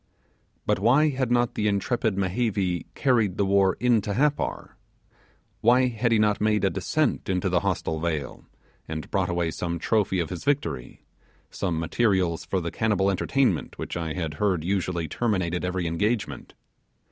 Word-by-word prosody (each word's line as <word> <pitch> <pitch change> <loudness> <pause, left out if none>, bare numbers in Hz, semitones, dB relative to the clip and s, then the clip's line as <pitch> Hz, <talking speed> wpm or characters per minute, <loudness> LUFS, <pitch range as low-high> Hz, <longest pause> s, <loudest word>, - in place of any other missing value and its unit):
But - - +1
why 145 +6 +4
had 130 -3 -1
not 120 0 +2
the 105 - 0
intrepid 105 +1 0
Mehevi 95 -2 -1
carried 115 -8 +2
the 100 - +2
war 95 -1 +3
into 115 -5 +2
Happar? 145 +2 -1 0.8
Why 125 +3 +4
had 115 0 -1
he 115 - +4
not 105 -1 +2
made 105 0 +2
a 95 - +2
descent - - -1
into 95 +1 0
the 90 -1 +2
hostile 80 -1 -2
vale, 80 -5 -3 0.4
and 80 0 -6
brought 95 -3 0
away 85 -2 0
some 85 0 -3
trophy 95 +1 +1
of 85 - -2
his 90 - -5
victory 145 - -2 0.5
some 85 -5 -2
materials 90 -1 +1
for 95 - -1
the 85 -1 -4
cannibal 100 -3 +1
entertainment 110 - 0
which - - -5
I 80 -2 -3
had 80 -3 -3
heard 95 -6 +1
usually 90 -2 -1
terminated 90 -3 -1
every 90 0 -2
engagement? 105 +7 -2
95 Hz, 160 wpm, -25 LUFS, 85-115 Hz, 0.8 s, why